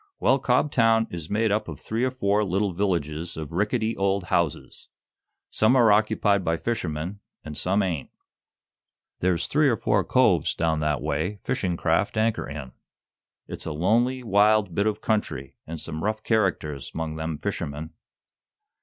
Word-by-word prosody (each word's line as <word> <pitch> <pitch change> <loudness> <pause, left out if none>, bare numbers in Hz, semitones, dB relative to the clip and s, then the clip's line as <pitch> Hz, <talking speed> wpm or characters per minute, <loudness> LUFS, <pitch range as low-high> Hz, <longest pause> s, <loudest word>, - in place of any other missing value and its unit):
"Well, 135 +2 +3
Cobtown 120 -4 +3
is 85 -2 -6
made 110 +1 +1
up 105 +1 0
of - - -7
three 115 +3 -2
or 130 - +2
four 105 -5 +1
little 95 0 0
villages 85 -3 -2
of 80 -1 -6
rickety 110 +5 0
old 95 0 0
houses. 85 -3 -1 0.6
Some 110 +4 +3
are 120 -4 +6
occupied 105 -2 +2
by 80 -1 0
fishermen, 90 -3 -3 0.2
and 75 -1 -7
some 95 +6 +1
ain't. 85 -7 -3 1.1
There's 90 -2 +1
three 150 -1 +3
or 115 - +1
four - - +1
coves - - +3
down 80 -2 0
that 75 -2 -1
way 85 +9 -1
fishing 90 -3 -1
craft - - +1
anchor 110 0 0
in. 70 -3 -7 0.8
It's - - -7
a 80 - -2
lonely, 120 +10 +1
wild 105 -2 +3
bit 100 +4 +1
of 105 0 -1
country, 105 -11 -2
and 80 0 -6
some 80 +1 -5
rough 110 +1 -1
characters 90 - 0
'mong 80 -1 -3
them 80 -1 -3
fishermen." 80 -4 -4
100 Hz, 155 wpm, -25 LUFS, 80-110 Hz, 1.1 s, are